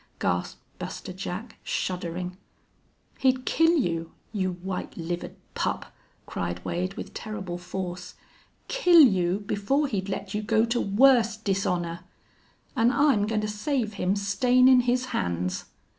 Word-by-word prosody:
gasped 90 0 -1 0.2
Buster 185 - -6
Jack, 195 +4 -6
shuddering. 180 0 -3 0.8
"He'd 260 -1 +2
kill 330 +1 +4
you 165 - -1 0.2
you 185 -3 0
white 180 +1 -5
livered 175 +1 -4 0.2
pup!" - - -2 0.3
cried 85 0 -4
Wade, 185 +3 -2
with - - -7
terrible 190 -5 -5
force. 180 0 -6 0.5
"Kill 360 -9 +6
you 190 - +4
before 205 +9 0
he'd 200 -7 -2
let 195 0 -4
you 210 - -1
go 220 +1 +2
to 235 +1 0
worse 230 +1 +4
dishonor!... 180 -5 -1 0.8
An' 230 +2 +4
I'm 270 -8 +3
goin' 215 -1 0
to 215 - -2
save 220 +1 -1
him 190 -1 0
stainin' 250 +6 +4
his 250 +1 +2
hands." 90 0 -1
200 Hz, 130 wpm, -26 LUFS, 180-240 Hz, 0.8 s, Kill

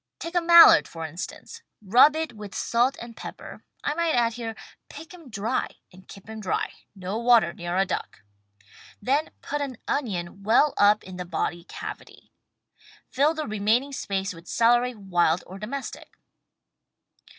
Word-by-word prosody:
Take 335 - -7
a 350 - +2
Mallard, 335 0 +8
for 165 -1 -7
instance. 180 - -8 0.2
Rub 245 +9 +5
it 315 -5 -3
with 210 -2 -10
salt 245 +3 +1
and 235 -1 -9
pepper - - -10 0.2
(I - - 0
might 335 0 0
add 235 -1 +2
here: 225 -1 -6 0.3
pick 310 +4 -11
'em 335 -7 -13
dry 220 +3 -2 0.3
and 185 +1 -17
keep 195 0 -13
'em 220 0 -8
dry 190 - -2
— - - -52
no 200 +5 -2
water 235 -7 +4
near 175 +1 -4
a 195 - +3
duck!), 100 - -5 0.8
then 275 +8 0
put 295 +1 -3
an 270 -4 -4
onion 195 -8 -3
well 235 +8 +3
up 210 +1 +4
in 185 -1 -10
the 180 - -5
body 175 -1 -3
cavity. - - -9 0.8
Fill 295 +5 +2
the 310 - -3
remaining 220 +6 0
space 195 -7 -3
with 165 0 -14
celery, 240 +1 +2
wild 175 -4 +1
or 190 +2 -10
domestic. 255 +6 -6
225 Hz, 160 wpm, -25 LUFS, 190-280 Hz, 0.8 s, Mallard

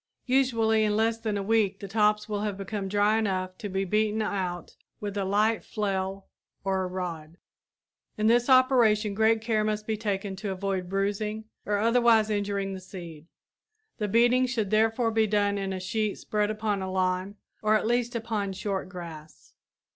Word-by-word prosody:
Usually 230 -4 +2
in 210 -1 +1
less 225 +1 +1
than 215 -2 -2
a 200 - -2
week 205 -2 +1
the 200 - -7
tops 210 +1 +2
will 205 -1 -2
have 210 -2 -2
become 200 0 -4
dry 205 +2 +2
enough 185 -3 -1
to 205 - -5
be 195 +1 -1
beaten 215 +2 +1
out 180 -5 -3 0.2
with 205 -1 -5
a 200 - 0
light 210 +3 +2
flail 195 -2 -3 0.4
or 190 -1 0
a 185 - -1
rod. 170 -3 -5 0.8
In 215 - 0
this 240 +3 +4
operation 235 -5 +4
great 220 +2 +3
care 220 -2 +1
must 215 0 -1
be 220 - -1
taken 200 -2 -3
to 205 +1 -4
avoid 190 -1 -2
bruising 205 +3 -2 0.2
or 205 0 +1
otherwise 230 0 +4
injuring 200 -1 -1
the 190 - -6
seed. 170 -4 -10 0.7
The 210 - 0
beating 240 +4 +4
should 225 -5 -2
therefore 225 +2 +2
be 220 0 +2
done 205 -1 +1
in 195 -1 -3
a 190 - -3
sheet 205 +3 -2
spread 210 -1 -1
upon 210 -2 -1
a 190 0 -4
lawn 185 +1 -1 0.3
or 215 0 +3
at 215 - +1
least 240 +1 0
upon 215 -4 -2
short 190 -1 -3
grass. 165 -4 -10
210 Hz, 175 wpm, -27 LUFS, 195-220 Hz, 0.8 s, this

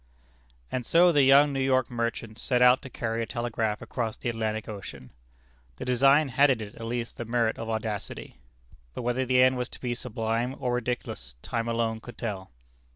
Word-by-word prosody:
And 125 - -2
so 175 +7 +5
the 145 -3 +4
young 140 +2 +6
New 135 - -1
York 130 -2 +2
merchant 115 -2 -3
set 125 - +1
out 125 +1 +6
to 130 - -9
carry 115 -2 -3
a 115 - -3
telegraph 115 -3 -2
across 115 -3 -3
the 120 - -3
Atlantic 110 -1 -2
Ocean! 100 - -8 0.6
The - - -7
design 135 +4 +4
had 140 +4 +4
in 130 -4 +2
it 105 -2 -7
at 115 - -8
least 120 0 -4
the 120 - -4
merit 115 -1 0
of 115 0 -5
audacity. 110 - -4 0.6
But - - -4
whether 125 +2 0
the 125 0 +5
end 130 0 +4
was 125 -1 -3
to - - -11
be 125 -1 -2
sublime 115 +1 -2
or 125 - -1
ridiculous 120 - -4
time 115 -1 -2
alone 115 -1 -1
could 120 +2 -12
tell. 100 -4 -4
120 Hz, 195 wpm, -27 LUFS, 110-125 Hz, 0.6 s, young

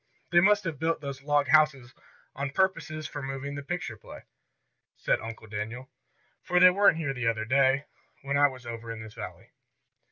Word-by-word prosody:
"They 175 - +6
must 205 +3 +4
have 165 -6 -4
built 165 +1 0
those 140 -2 -6
log 145 0 +1
houses 140 -6 +3 0.4
on 140 0 -3
purposes 155 -2 -1
for 145 - -7
the 135 - -5
moving 135 +1 -5
picture 155 -7 -4
play," - - -12 0.7
said - - 0
Uncle 115 0 -8
Daniel. 110 +5 -6 0.5
"For 180 - +1
they 180 0 +8
weren't 200 -3 +4
here 150 -4 -2
the 125 -3 -2
other 110 -1 0
day, 135 +3 +3 0.4
when 140 0 -2
I 145 0 +6
was 130 -3 -10
over 115 0 -6
in 115 -1 -7
this 110 -1 -11
valley." - - -9
140 Hz, 185 wpm, -28 LUFS, 120-155 Hz, 0.7 s, they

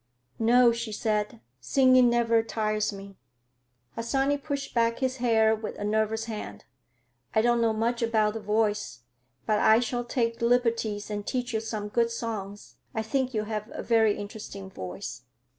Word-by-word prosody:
"No," 240 +1 +5
she 235 -1 -4
said, 215 +1 -2 0.2
"singing 255 - +5
never 230 -1 +3
tires 215 -1 -1
me." 195 -1 -11 0.8
Harsanyi 270 +5 0
pushed 280 -1 -4
back 230 -1 +2
his 260 0 -1
hair 225 -3 +3
with 220 0 -5
a - - -5
nervous 220 +1 0
hand. 210 - -7 0.7
"I 220 - +4
don't 240 0 +3
know 230 -1 +3
much 230 +2 -1
about 220 -2 +2
the 225 - -4
voice, 210 - -1 0.4
but 215 -1 +2
I 220 +1 +6
shall 245 0 -2
take 235 -1 -1
liberties 230 -3 +1
and 205 0 -3
teach 250 -2 -2
you 220 - +1
some 215 -2 -4
good 230 +2 +1
songs. 215 -4 -6 0.2
I 220 - -1
think 260 +2 -1
you 215 - 0
have 215 0 -4
a - - -5
very 220 -3 +3
interesting 200 -2 -8
voice." 95 - -7
225 Hz, 160 wpm, -27 LUFS, 210-235 Hz, 0.8 s, I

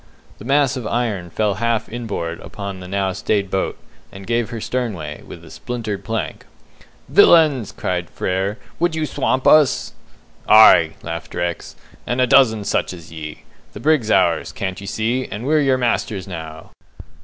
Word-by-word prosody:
The - - -10
mass 140 0 +2
of 125 -4 -4
iron 110 -8 -2
fell 105 +2 0
half 115 -2 0
in 120 0 -6
board 85 -5 -4
upon 100 -2 -7
the 90 - -9
now 95 0 -1
stayed 100 0 -1
boat, 95 - -1 0.3
and 95 0 -11
gave 115 0 0
her 115 - -5
sternway, 105 -12 -4
with 85 - -12
a 80 - -14
splintered 105 +3 -5
plank. 115 +3 -4 0.6
"Villains!" 150 - +5
cried 90 -2 -3
Frere, 95 +3 -2 0.2
"would 170 -1 +1
you 160 -1 -1
swamp 130 -3 -1
us?" 155 -4 +4 0.6
"Aye," 85 -7 +7
laughed 85 0 -6
Rex, 85 -1 -3 0.3
"and 120 +1 -1
a 130 - +5
dozen 115 -4 +4
such 100 - -1
as 85 -3 -12
ye! 75 -2 -8 0.3
The - - -8
brig's 145 -3 +2
ours, - - +2
can't 95 -1 -5
ye 100 - -8
see, 115 +5 -1
and 105 +4 -6
we're 155 +2 +3
your 135 -2 +2
masters 110 -5 -1
now!" 80 -3 -8
110 Hz, 165 wpm, -20 LUFS, 95-125 Hz, 0.6 s, Aye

